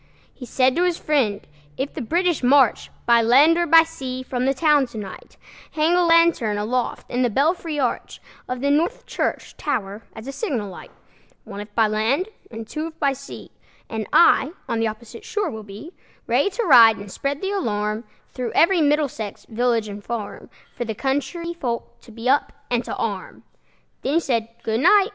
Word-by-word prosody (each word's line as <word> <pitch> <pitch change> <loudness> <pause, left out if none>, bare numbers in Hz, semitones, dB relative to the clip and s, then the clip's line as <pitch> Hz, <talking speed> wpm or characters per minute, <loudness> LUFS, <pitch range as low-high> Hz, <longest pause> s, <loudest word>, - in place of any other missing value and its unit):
He 250 - -10
said 255 +1 +2
to 350 - +2
his 355 -2 +1
friend, 250 -10 0 0.3
"If 270 +2 -3
the 305 - -5
British 345 +6 0
march 260 -2 +3 0.2
By 235 -1 +5
land 270 +8 +5
or 345 -1 0 0.2
sea 260 -5 -6
from 255 0 -2
the 270 - +3
town 295 -2 +3
to 235 - -11
night, 195 -3 -9 0.4
Hang 315 +2 +2
a 355 0 +4
lantern 335 -11 +3
aloft 235 +4 -2
in 245 - 0
the 245 - +2
belfry 310 - 0
arch 250 -3 -2 0.3
Of 250 0 -3
the 280 +1 +1
North 310 +4 0
Church - - -3
tower 205 -7 -3
as 220 - -10
a 275 - -5
signal 255 - -3
light, 180 - -11 0.5
One, 205 -3 -9
if 205 0 -12
by 225 - +4
land, 225 - 0 0.2
and 225 -1 -8
two, 310 +5 -4
if 325 0 -12
by 280 -3 +1
sea; 275 +1 -11 0.4
And 220 -2 -3
I 320 -2 +5
on 230 - -1
the 225 - +1
opposite 225 +2 -8
shore 420 -2 -2
will 220 - -7
be, 215 - -11 0.3
Ready - - +2
to 470 +4 -3
ride 230 - +7
and 200 0 -9
spread 280 +5 -3
the 385 +3 -3
alarm 215 - -2 0.3
Through 250 -3 -4
every 340 0 +4
Middlesex 285 -8 -1
village 230 -1 0
and 205 0 -8
farm, 225 -2 -6 0.3
For - - -3
the 220 -2 -4
country 290 - -2
folk 240 -8 -5
to 235 - -16
be 230 +2 -6
up 280 +3 +2 0.2
and 240 0 +1
to - - -4
arm." 200 -4 -5 0.6
Then 275 - -1
he - - +5
said, 235 -8 -1 0.2
"Good 220 0 -1
night!" 395 - +5
255 Hz, 190 wpm, -22 LUFS, 225-315 Hz, 0.6 s, ride